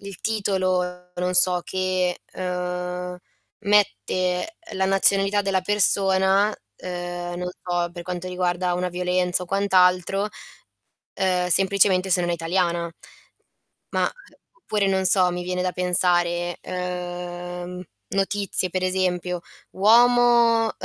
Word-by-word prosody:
il 200 -2 -10
titolo 185 -4 -2
non 180 +1 -2
so 180 -1 +8
che 185 -1 -1
ehm, 180 0 -4 0.4
mette 200 - 0 0.2
la 190 0 -1
nazionalità 195 +1 +2
della 195 -2 0
persona, 195 0 +3 0.2
ehm, 175 -1 -6
non 180 0 -4
so 175 -1 -2
per 175 0 -9
quanto 180 +1 -5
riguarda 180 0 -1
una 180 0 -2
violenza 180 0 0
o - - -18
quant'altro, 190 0 +2 0.9
ehm, 180 -1 0
semplicemente 190 0 +2
se 180 - +3
non 175 - -2
è - - +1
italiana. 170 0 -1 1.1
Ma - - +1 0.5
oppure 210 -2 -1
non 190 0 +1
so 180 -1 +3
mi 180 - -4
viene 180 0 -3
da 185 - -1
pensare 175 -1 0
ehm, 180 0 -6 0.3
notizie 195 -1 -1
per 185 +1 -3
esempio 180 -1 -1 0.3
uomo 235 +2 +4
180 Hz, 115 wpm, -23 LUFS, 180-195 Hz, 1.1 s, so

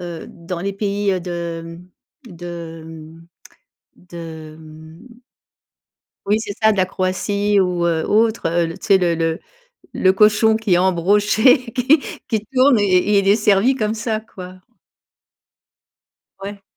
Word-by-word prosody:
heu, 175 -2 -7
dans 170 +1 -7
les 200 +2 -3
pays 200 -2 -1
de, 170 -1 -5
hem, 170 +2 -12 0.5
de, 170 -2 -8
mmh, 160 +1 -13 0.7
de 175 -1 -14 0.4
hem 160 +5 -14 1.2
Oui, 210 +2 +2
c'est 205 - -5
ça 220 - +5
de - - -4
la 185 - +3
Croatie 200 +2 -1
ou 180 -2 0
heu, 160 -2 0
autre, 220 -4 +1
heu, 170 0 0
tu - - -11
sais 195 -1 +5
le 175 -2 +1
le 165 0 -2 0.5
le 185 - +3
cochon 215 +2 +4
qui 220 -4 0
est - - +4
embroché, 205 - +2
qui 265 +5 +3 0.3
qui 220 -3 -2
tourne 260 -2 +4
et 200 +1 +2
il 195 - -1
est 200 - +5
servi 210 +4 +2
comme 215 -3 -1
ça, 220 0 -3
quoi. 185 -4 -12 1.8
Ouais. 200 0 -8
190 Hz, 145 wpm, -19 LUFS, 170-210 Hz, 1.8 s, ça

